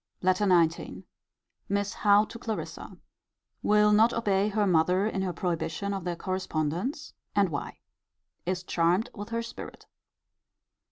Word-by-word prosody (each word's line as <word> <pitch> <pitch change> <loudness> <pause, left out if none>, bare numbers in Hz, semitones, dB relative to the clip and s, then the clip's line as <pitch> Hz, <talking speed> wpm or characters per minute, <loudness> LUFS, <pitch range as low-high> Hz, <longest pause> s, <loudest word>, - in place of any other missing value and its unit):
LETTER 185 +2 +3
XIX. 170 -2 +2 0.7
Miss 200 +1 0
Howe 205 0 +4
to 230 - -10
Clarissa. 225 -2 -5 0.6
Will 210 0 +4
not 220 +3 +5
obey 205 -3 +1
her 210 0 +1
mother 180 +2 +3
in 200 -3 -1
her 190 -1 -1
prohibition 175 +3 -2
of 190 -3 -4
their 175 -1 -1
correspondence: 185 - -3 0.2
and 200 -2 +3
why. 145 -3 -5 0.7
Is 180 0 -2
charmed 175 +4 +1
with 205 +1 -7
her 230 0 -2
spirit. 230 - -9
195 Hz, 130 wpm, -28 LUFS, 175-210 Hz, 0.7 s, not